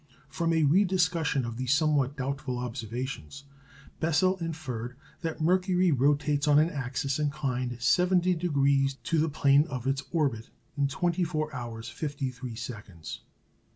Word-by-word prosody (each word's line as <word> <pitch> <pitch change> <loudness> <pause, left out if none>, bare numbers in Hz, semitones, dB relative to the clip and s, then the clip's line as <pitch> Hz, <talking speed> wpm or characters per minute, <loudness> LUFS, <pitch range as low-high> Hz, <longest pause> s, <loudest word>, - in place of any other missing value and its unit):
From 165 +3 -1
a 160 -1 +3
rediscussion 165 -4 +2
of 115 -1 -5
these 130 +2 +2
somewhat 145 -3 +1
doubtful 135 -1 -3
observations 125 - -5 0.6
Bessel 175 +4 +2
inferred 135 -8 -5 0.3
that 165 -1 -4
Mercury 180 +1 +3
rotates 145 +2 +2
on 145 -1 +6
an 155 +3 +4
axis 135 +1 -2
inclined 135 -4 -1
70° 160 -3 +2
to 165 - +1
the 160 +1 +2
plane 145 0 +4
of 130 -5 -5
its 135 0 0
orbit 135 -9 0 0.3
in 140 -1 +2
24 165 0 -1
hours 120 -3 -6
53 130 -2 -4
seconds. 105 - -8
140 Hz, 125 wpm, -28 LUFS, 125-160 Hz, 0.6 s, on